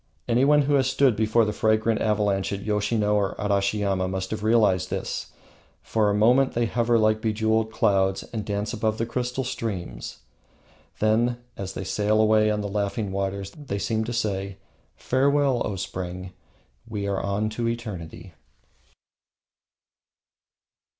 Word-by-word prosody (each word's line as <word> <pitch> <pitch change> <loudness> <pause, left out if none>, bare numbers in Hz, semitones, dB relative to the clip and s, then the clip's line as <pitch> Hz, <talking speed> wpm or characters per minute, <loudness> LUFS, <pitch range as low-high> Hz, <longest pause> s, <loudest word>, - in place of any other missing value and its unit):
Anyone 140 +5 +4
who 145 +1 0
has 135 -2 +3
stood 130 -3 +3
before 110 +1 +3
the 105 - -2
fragrant 110 +1 +1
avalanche 105 -3 +1
at 100 -1 -4
Yoshino 105 0 +1
or 100 -2 +1
Arashiyama 100 -2 0
must 95 0 -3
have 110 -1 -3
realized 105 -4 +3
this. - - -4 0.5
For 110 -2 +1
a - - +1
moment 125 +6 +4
they 120 0 +1
hover 120 +1 +1
like 110 0 +2
bejewelled 110 0 +1
clouds 95 -3 +1
and 110 -2 -2
dance 100 0 -3
above 110 0 -1
the 115 - -1
crystal 125 +2 -2
streams; 110 - -5 0.8
then, 115 +3 +2 0.2
as 95 -1 -5
they - - -4
sail 105 +3 +1
away 110 0 +4
on 105 0 0
the 100 - -3
laughing 100 +1 -2
waters, 100 0 -3
they 130 -5 -5
seem 110 +2 -1
to 120 - -4
say: 100 -4 -2 0.4
"Farewell, 140 -1 +2
O 105 - -3
Spring! 90 0 -5 0.5
We 105 -3 -4
are 100 -1 -1
on 100 +2 -1
to 115 +2 -2
eternity." 95 -7 -6
110 Hz, 145 wpm, -25 LUFS, 100-115 Hz, 0.8 s, Anyone